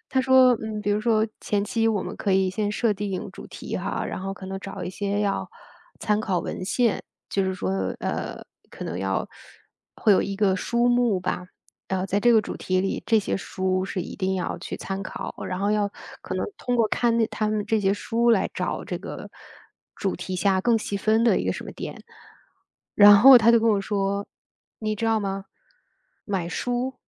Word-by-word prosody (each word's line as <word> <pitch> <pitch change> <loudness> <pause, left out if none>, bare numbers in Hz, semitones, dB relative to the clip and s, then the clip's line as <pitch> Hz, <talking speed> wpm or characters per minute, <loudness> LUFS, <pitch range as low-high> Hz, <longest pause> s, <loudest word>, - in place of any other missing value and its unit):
他 265 - +2
说， 260 -1 +6
嗯， 215 -1 -4
比 205 0 -1
如 205 - +1
说 220 -2 +3
前 205 -1 0
期 225 +2 0
我 210 -4 0
们 - - -6
可 200 - 0
以 190 0 +3
先 205 +2 -1
设 220 0 +1
定 195 -1 -4
主 - - -10
题 - - -6
哈， - - -3
然 - - -4
后 195 +1 -4
可 190 -1 -9
能 195 0 -4
找 195 -1 -7
一 - - -4
些 200 +1 -2
要 200 -1 -1 0.5
参 210 -1 +1
考 195 -4 0
文 - - -5
献， 230 +3 +1 0.3
就 195 - 0
是 190 0 -1
说， 95 - -3 0.3
呃， - - -3 0.3
可 - - -8
能 85 - -4
要 95 0 -1 0.7
会 210 - +4
有 - - +4
一 195 - -3
个 195 -2 +2
书 235 +5 +1
目 240 -5 +2
吧。 180 0 -3 0.4
然 190 -1 -1
后 - - -1
在 200 +2 0
这 240 +2 +5
个 220 -2 +5
主 - - -6
题 185 0 0
里， 195 - -2
这 225 - +4
些 205 - -1
书 185 -1 -1
是 190 - -3
一 - - -8
定 190 -1 0
要 180 - -3
去 - - -6
参 195 0 -5
考， - - -6
然 185 - -3
后 200 +1 +1
要 210 -1 +1 0.3
可 - - -6
能 - - -1
通 245 - -1
过 230 -2 +3
看 235 +1 +1
那 230 - +3
它 215 - -1
们 215 -1 -1
这 220 0 +2
些 195 0 +2
书， 230 +3 0
来 220 -4 +2
找 - - -3
这 - - -4
个 - - -8 0.7
主 195 -3 -2
题 185 +1 -5
下 190 0 +2
更 235 +3 +3
细 205 -2 -3
分 220 +3 +2
的 235 - +4
一 - - -3
个 - - +1
什 - - -6
么 - - -7
点。 - - -7 0.9
然 205 0 +9
后 260 +3 +10
他 235 +1 +5
就 235 - +5
跟 230 - +2
我 205 -2 +2
说： 200 0 -1 0.5
“你 215 -1 -2
知 225 - -1
道 225 -1 +2
吗？ 195 -1 -3 0.8
买 190 -5 -2
书 245 +8 -2
205 Hz, 235 characters per minute, -25 LUFS, 190-225 Hz, 0.9 s, 后